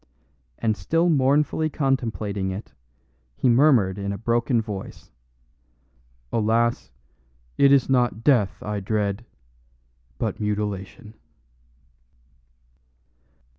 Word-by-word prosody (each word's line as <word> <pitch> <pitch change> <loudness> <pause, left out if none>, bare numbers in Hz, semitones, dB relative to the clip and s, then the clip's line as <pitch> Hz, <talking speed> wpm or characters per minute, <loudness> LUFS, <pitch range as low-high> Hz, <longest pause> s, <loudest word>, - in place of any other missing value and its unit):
And 110 -2 0
still 165 +9 +1
mournfully 150 +2 +2
contemplating 115 -9 -1
it, 95 +3 -7 0.6
he 130 - +1
murmured 120 -7 +4
in 100 0 -3
a 100 - -4
broken 115 +2 +1
voice: 105 -4 -7 1.2
"Alas, 115 +2 +1 0.7
it 140 - +5
is 140 -3 +4
not 120 -4 +1
death 120 -9 +2
I 105 -1 -3
dread, 105 +2 -2 0.9
but - - -3
mutilation." 105 0 -4
115 Hz, 90 wpm, -24 LUFS, 105-130 Hz, 1.2 s, it